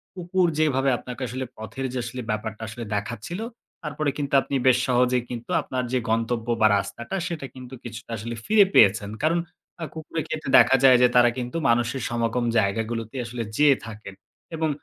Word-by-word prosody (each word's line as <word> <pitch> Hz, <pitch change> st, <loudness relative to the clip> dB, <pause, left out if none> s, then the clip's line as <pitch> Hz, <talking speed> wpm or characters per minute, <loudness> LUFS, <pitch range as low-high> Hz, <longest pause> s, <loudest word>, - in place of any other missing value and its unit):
কুকুর 180 Hz, 0 st, +1 dB
যেভাবে 135 Hz, -3 st, +2 dB
আপনাকে 125 Hz, +1 st, -9 dB
আসলে 130 Hz, +3 st, -4 dB
পথের 110 Hz, +5 st, -6 dB
যে -, -, -3 dB
আসলে 125 Hz, +2 st, -5 dB
ব্যাপারটা 110 Hz, +1 st, -3 dB
আসলে 115 Hz, +2 st, -7 dB
দেখাচ্ছিল। 110 Hz, -, -4 dB, 0.4 s
তারপরে 150 Hz, -1 st, -2 dB
কিন্তু 140 Hz, -2 st, -4 dB
আপনি 140 Hz, -, -4 dB
বেশ 130 Hz, -1 st, +6 dB
সহজেই 125 Hz, -1 st, +2 dB
কিন্তু 120 Hz, -1 st, -6 dB
আপনার 130 Hz, -1 st, -3 dB
যে 130 Hz, -, +3 dB
গন্তব্য 115 Hz, +1 st, 0 dB
বা 110 Hz, -, +7 dB
রাস্তাটা 115 Hz, -, -4 dB
সেটা 165 Hz, -6 st, -5 dB
কিন্তু 130 Hz, 0 st, -10 dB
কিছুটা 115 Hz, 0 st, -9 dB
আসলে 115 Hz, +2 st, -5 dB
ফিরে 210 Hz, -2 st, +6 dB
পেয়েছেন। 100 Hz, +1 st, +5 dB
কারণ 165 Hz, +2 st, +3 dB, 0.4 s
আ -, -, -2 dB
কুকুরের 160 Hz, 0 st, -5 dB
ক্ষেত্রে 155 Hz, -3 st, -4 dB
দেখা -, -, +6 dB
যায়, 130 Hz, -2 st, +8 dB
যে 125 Hz, -, +7 dB
তারা 120 Hz, -1 st, +6 dB
কিন্তু 125 Hz, +4 st, -3 dB
মানুষের 120 Hz, +3 st, +1 dB
সমাগম 120 Hz, +1 st, -1 dB
জায়গাগুলোতেই 110 Hz, +4 st, -1 dB
আসলে 120 Hz, 0 st, -4 dB
যেয়ে 145 Hz, -2 st, +6 dB
থাকেন 110 Hz, -3 st, -9 dB, 0.4 s
এবং 160 Hz, 0 st, 0 dB
125 Hz, 175 wpm, -24 LUFS, 115-140 Hz, 0.4 s, যায়